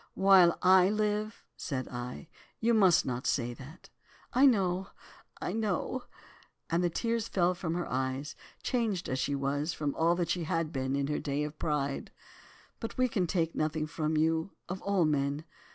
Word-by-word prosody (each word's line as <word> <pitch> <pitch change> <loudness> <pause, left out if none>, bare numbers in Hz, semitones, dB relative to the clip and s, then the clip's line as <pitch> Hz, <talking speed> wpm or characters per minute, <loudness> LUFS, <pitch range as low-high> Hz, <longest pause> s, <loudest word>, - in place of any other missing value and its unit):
"'While 190 -3 +6
I 185 0 +6
live,' 210 0 -1
said 130 -6 -4
I, 125 +6 -6 0.3
'you 235 +1 +2
must 190 -6 +5
not 125 0 -3
say 120 -2 0
that.' 135 +7 -13 0.4
"'I 265 +3 +6
know—I 190 -5 -2
know,' 220 +3 -2 0.7
and 170 +2 +2
the 175 - +2
tears 230 +5 -1
fell 180 -1 +2
from 175 -2 -3
her 175 - -2
eyes, 130 +3 -2 0.3
changed 220 -8 -1
as 130 - -2
she 140 +2 0
was, 145 +3 -1
from 145 -2 -2
all 165 +2 +2
that 175 -2 -1
she 175 -2 -1
had 165 -2 -1
been 130 -1 -1
in 140 0 0
her 150 +1 -1
day 145 0 -2
of 150 0 -6
pride. 140 -3 -1 0.7
'But 225 - -6
we 255 0 +3
can 190 -7 0
take 165 -1 0
nothing 155 0 -1
from 155 0 -2
you, 160 +3 +1
of 185 +1 -5
all 195 -4 +2
men. 145 0 0
165 Hz, 170 wpm, -30 LUFS, 145-190 Hz, 0.7 s, While